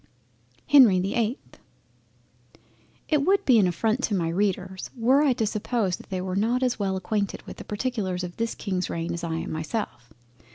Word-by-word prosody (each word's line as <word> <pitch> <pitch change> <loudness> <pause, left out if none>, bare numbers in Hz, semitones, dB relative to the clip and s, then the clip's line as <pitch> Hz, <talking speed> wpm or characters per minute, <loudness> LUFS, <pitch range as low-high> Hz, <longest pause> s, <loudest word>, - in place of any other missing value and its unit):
HENRY 245 -10 +7
the 190 +2 -1
8th 235 +3 -3 1.5
It 300 -3 +2
would 390 +4 +2
be 245 -4 +6
an 195 - +4
affront 220 +7 0
to 210 - -1
my 170 -3 0
Readers 190 0 -2
were 255 +5 +4
I 285 -4 +4
to 225 - -1
suppose 210 -3 -1
that - - -15
they 185 -1 -2
were 185 0 -3
not 235 +6 +1
as 250 -3 0
well 190 -2 0
acquainted 200 +2 -2
with - - -10
the - - -8
particulars 205 -5 -2
of 175 -1 -7
this 230 0 -2
King's 185 -3 -3
reign 170 +1 -3
as 170 - -5
I 165 -1 -2
am 165 - -4
myself. 155 - -4
205 Hz, 190 wpm, -25 LUFS, 180-235 Hz, 1.5 s, HENRY